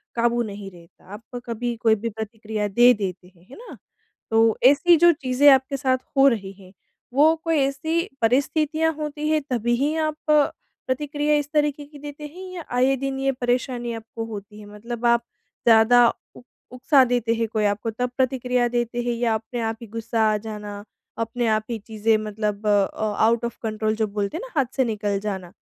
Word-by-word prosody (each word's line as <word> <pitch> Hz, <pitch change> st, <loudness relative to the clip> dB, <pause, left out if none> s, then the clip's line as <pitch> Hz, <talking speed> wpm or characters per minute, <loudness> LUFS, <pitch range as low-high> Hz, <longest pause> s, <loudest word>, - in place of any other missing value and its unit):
काबू 235 Hz, 0 st, +1 dB
नहीं 200 Hz, -2 st, -7 dB
रहता, 170 Hz, -1 st, -19 dB
आपका 230 Hz, +3 st, -9 dB
कभी 240 Hz, +1 st, -3 dB
कोई 220 Hz, -2 st, +4 dB
भी 230 Hz, +2 st, -4 dB
प्रतिक्रिया 220 Hz, -1 st, -4 dB
दे 240 Hz, +5 st, +6 dB
देते 190 Hz, -4 st, -5 dB
हैं, 170 Hz, +2 st, -23 dB
है -, -, -12 dB
ना? 480 Hz, -, -11 dB, 0.5 s
तो 225 Hz, 0 st, +3 dB
ऐसी 290 Hz, +6 st, +6 dB
जो 345 Hz, +2 st, +6 dB
चीज़ें 260 Hz, +2 st, +4 dB
आपके 265 Hz, +1 st, +2 dB
साथ 260 Hz, -1 st, +1 dB, 0.2 s
हो 275 Hz, +1 st, +7 dB
रही 200 Hz, -6 st, 0 dB
हैं, 185 Hz, 0 st, -16 dB, 0.4 s
वो 310 Hz, +4 st, +5 dB
कोई 330 Hz, -2 st, +1 dB
ऐसी 315 Hz, +6 st, -1 dB
परिस्थितियाँ 305 Hz, +6 st, +1 dB
होती 300 Hz, 0 st, -4 dB
हैं 310 Hz, -1 st, +2 dB
तभी 240 Hz, -1 st, 0 dB
ही 290 Hz, +5 st, 0 dB
आप 310 Hz, -1 st, -1 dB
प्रतिक्रिया 295 Hz, 0 st, 0 dB
इस 290 Hz, 0 st, -1 dB
तरीके 295 Hz, -1 st, 0 dB
की 290 Hz, 0 st, -14 dB
देते 295 Hz, +1 st, -8 dB
हैं 370 Hz, 0 st, -9 dB
या 345 Hz, -3 st, -6 dB
आए 265 Hz, +2 st, +3 dB
दिन 270 Hz, 0 st, -3 dB
ये 270 Hz, 0 st, +1 dB
परेशानी 245 Hz, -1 st, -2 dB
आपको 225 Hz, 0 st, -7 dB
होती 210 Hz, -1 st, -9 dB
है? 210 Hz, -, -11 dB
मतलब 235 Hz, +2 st, -6 dB
आप 235 Hz, 0 st, +3 dB, 0.4 s
ज़्यादा 235 Hz, +2 st, +6 dB, 0.3 s
उ -, -, -12 dB, 0.3 s
उकसा 265 Hz, +2 st, +4 dB
देते 240 Hz, -2 st, 0 dB
हैं 230 Hz, 0 st, -1 dB
कोई 215 Hz, -1 st, +1 dB
आपको 205 Hz, +2 st, -1 dB
तब 245 Hz, +3 st, -2 dB
प्रतिक्रिया 250 Hz, -2 st, +1 dB
देते 240 Hz, 0 st, -2 dB
हैं 240 Hz, 0 st, -1 dB
या 235 Hz, -1 st, 0 dB
अपने 230 Hz, +2 st, -5 dB
आप 225 Hz, 0 st, -2 dB
ही 230 Hz, -, -9 dB
गुस्सा 230 Hz, +1 st, -3 dB
आ 210 Hz, -, +1 dB
जाना, 210 Hz, -1 st, -7 dB, 0.3 s
अपने 230 Hz, +1 st, -2 dB
आप 215 Hz, 0 st, +1 dB
ही 230 Hz, -, -2 dB
चीज़ें 220 Hz, 0 st, +1 dB
मतलब 210 Hz, 0 st, -3 dB
अ, 205 Hz, +1 st, +1 dB
आउट 230 Hz, +1 st, +3 dB
ऑफ़ 235 Hz, -, -5 dB
कंट्रोल 215 Hz, 0 st, -1 dB
जो 220 Hz, -1 st, 0 dB
बोलते 205 Hz, +8 st, -3 dB
हैं -, -, -5 dB
ना -, -, -18 dB
हाथ 260 Hz, -1 st, -2 dB
से 265 Hz, -, +4 dB
निकल 205 Hz, -3 st, -2 dB
जाना, 190 Hz, -3 st, -5 dB
235 Hz, 190 wpm, -23 LUFS, 215-275 Hz, 0.5 s, हो